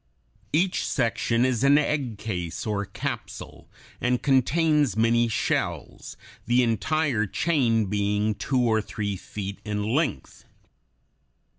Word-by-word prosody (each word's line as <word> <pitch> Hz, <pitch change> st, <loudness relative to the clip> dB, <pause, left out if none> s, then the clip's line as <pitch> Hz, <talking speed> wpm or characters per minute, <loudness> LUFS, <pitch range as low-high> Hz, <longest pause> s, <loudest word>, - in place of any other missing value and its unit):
Each 180 Hz, +4 st, +1 dB
section 115 Hz, +1 st, +1 dB
is 130 Hz, -2 st, 0 dB
an 140 Hz, +1 st, +6 dB
egg 140 Hz, -7 st, -1 dB
case, 90 Hz, -6 st, -4 dB
or 105 Hz, -2 st, -1 dB
capsule, -, -, -6 dB, 0.3 s
and 125 Hz, 0 st, 0 dB
contains 145 Hz, -, +2 dB
many 115 Hz, +1 st, +3 dB
shells, 115 Hz, -, -3 dB, 0.3 s
the 120 Hz, +2 st, +4 dB
entire 120 Hz, 0 st, 0 dB
chain 120 Hz, -, +1 dB
being 105 Hz, +1 st, 0 dB
two 125 Hz, +6 st, -1 dB
or 110 Hz, -2 st, +2 dB
three 105 Hz, -1 st, -4 dB
feet 100 Hz, +1 st, -7 dB
in 105 Hz, -1 st, -2 dB
length. 155 Hz, +1 st, -2 dB
115 Hz, 115 wpm, -25 LUFS, 105-140 Hz, 0.3 s, an